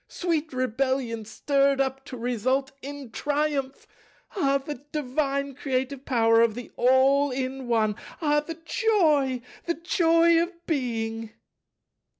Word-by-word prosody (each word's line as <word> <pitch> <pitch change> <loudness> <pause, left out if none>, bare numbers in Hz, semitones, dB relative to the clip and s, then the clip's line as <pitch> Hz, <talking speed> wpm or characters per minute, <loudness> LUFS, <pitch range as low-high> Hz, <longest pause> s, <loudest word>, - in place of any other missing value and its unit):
Sweet 325 -3 -2
rebellion 255 -2 -1
stirred 275 +4 +1
up 270 0 -1
to 255 - -8
result 250 +3 0
in 280 -3 -8
triumph! 290 -1 -1 0.5
Ah, 275 -8 +2
the 275 -1 -7
divine 280 -1 -1
creative 265 0 -3
power 230 -2 +4
of 230 -2 +3
the 245 0 -8
All 265 +3 +4
in 260 0 -4
One! 220 -3 +2 0.2
Ah, 295 -2 +2
the 320 +2 -6
joy, 305 - +2 0.2
the 340 - +1
joy 335 0 +3
of 345 0 -5
Being!" 225 -6 -2
275 Hz, 125 wpm, -26 LUFS, 250-295 Hz, 0.5 s, power